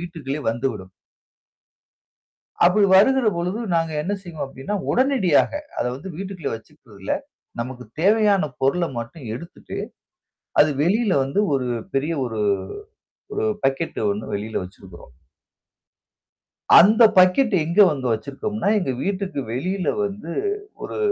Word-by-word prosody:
வீட்டுக்குள்ளே 155 -5 -5
வந்துவிடும். 115 -6 -4 1.7
அப்டி 185 +4 +5
வருகிற 260 +4 +5
பொழுது 180 +6 -2 0.2
நாங்க 165 -1 0
என்ன 195 +6 -2
செய்வோம் 165 -4 -6
அப்டினா, 135 +8 -6 0.2
உடனடியாக 250 - +3 0.3
அத - - 0
வந்து 170 +8 -8
வீட்டுக்குள்ள 190 -5 -5
வச்சுக்கறதில்ல, 110 -5 -7 0.5
நமக்கு 125 +1 -5 0.2
தேவையான 205 -1 +4 0.2
பொருள 140 +7 +2 0.2
மட்டும் 120 +5 -8
எடுத்துட்டு, 170 +8 -9 0.8
அது 150 - +4
வெளியில 200 +4 +2
வந்து 135 +9 -1 0.2
ஒரு 130 -2 -1 0.3
பெரிய 150 +5 0
ஒரு 110 -3 -3 0.9
ஒரு 415 - -1 0.2
பக்கெட் 135 +5 -1
ஒண்ணு 105 +2 -3
வெளியில 105 +2 -3
வச்சுருக்குறோம். 90 -6 -14 1.7
அந்த 215 +6 +6
பக்கெட் 185 +6 +5
எங்க 170 +6 -1
வந்து 135 -4 -3
வச்சிருக்கோம்னா, 190 - -3
எங்க 135 - -2
வீட்டுக்கு 195 -4 -2
வெளியில 180 +7 -1 0.2
வந்து 200 -4 -6 0.5
ஒரு, - - -5
165 Hz, 115 wpm, -22 LUFS, 130-195 Hz, 1.7 s, அந்த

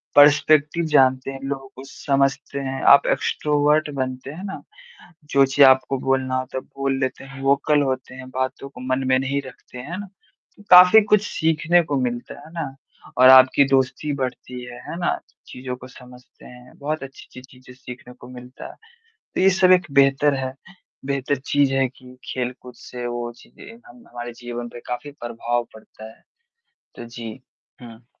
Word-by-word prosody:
Perspective 150 +2 +4
जानते 130 -1 +3
हैं, 135 - -8
लोगों 135 -1 -5
को 130 - -10
समझते 140 0 -1
हैं। 135 -1 -4
आप 140 - +5
एक्सट्रोवर्ट 150 +1 +1
बनते 130 +1 -4
हैं 175 +5 -9
ना, 195 - -7 0.6
जो 140 -2 +3
चीज़ 135 +1 +5
आपको 130 +1 +3
बोलना 130 -1 -1
होता 130 0 -5
है - - -3 0.2
बोल 135 0 0
लेते 130 0 -3
हैं, 135 0 -11
वोकल 140 +2 +2
होते 130 -1 -4
हैं, 130 0 -10
बातों 130 +1 -4
को 125 -2 -13
मन 130 +1 -2
में 130 0 +3
नहीं 140 +1 -2
रखते। 125 0 -14
है 165 +9 -7
ना? 205 - -7 0.5
तो 205 - -17
काफ़ी 180 +4 +9
कुछ 210 0 +3
सीखने 160 +2 +2
को 145 -3 -2
मिलता 120 +3 -4
है। - - -14
है - - -16
ना? 145 -5 -5 0.4
और 130 +1 +7
आपकी 130 +2 +7
दोस्ती 135 +2 0
बढ़ती 125 -2 -5
है। 120 0 -10
है 170 - -5
ना? 175 - -1 0.3
चीज़ 125 0 -10
को 125 - -10
समझते 125 -1 -17
हैं, 125 0 -15
बहुत 150 0 -3
अच्छी-अच्छी 130 -1 -12 0.2
चीज़ें 130 0 -15
सीखने 125 0 -11
को 125 - -15
मिलता 125 - -11
है। - - -19 0.6
तो - - -1
ये 190 +1 +5
सब 185 0 +6
एक 180 -1 +3
बेहतर 135 +1 +3
है 130 0 -4 0.5
बेहतर 140 0 -1
चीज़ 140 +1 0
है 135 -1 +2
कि 125 0 -17
खेल-कूद 125 0 -6
से 125 -1 -8
वो 120 0 -4
चीज़ें 230 - -15
हम-हमारे 120 - -10
जीवन 120 0 -7
पे 120 - -11
काफ़ी 125 +4 -5
प्रभाव 120 0 -3
पड़ता 110 0 -14
है। - - -30 0.7
तो 120 - -9
जी 115 -1 -8 0.5
हुँ। 115 0 -13
135 Hz, 175 wpm, -22 LUFS, 125-145 Hz, 0.7 s, काफ़ी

